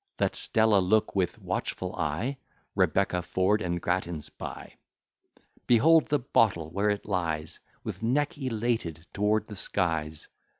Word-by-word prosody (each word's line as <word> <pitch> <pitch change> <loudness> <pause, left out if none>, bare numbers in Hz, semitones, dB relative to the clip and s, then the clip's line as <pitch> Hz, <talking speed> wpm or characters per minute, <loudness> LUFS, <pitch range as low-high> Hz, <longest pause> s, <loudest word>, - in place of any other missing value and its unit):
Let - - +1
Stella 110 -3 +3
look 105 +4 +2
with 95 -3 0
watchful - - -3
eye, 115 - -2 0.3
Rebecca, 95 -2 +2
Ford, 95 +4 +1
and 85 -2 -1
Grattans 85 -3 -2
by. - - -8 0.9
Behold 155 +7 +5
the 145 - +2
bottle, 105 - +1
where 100 +4 +1
it 105 -1 -1
lies 80 -6 -2 0.2
With 95 - -6
neck 140 +6 +1
elated 115 - -2
toward 105 +1 +1
the 105 - -9
skies! 80 -6 -1
100 Hz, 130 wpm, -28 LUFS, 85-115 Hz, 0.9 s, Behold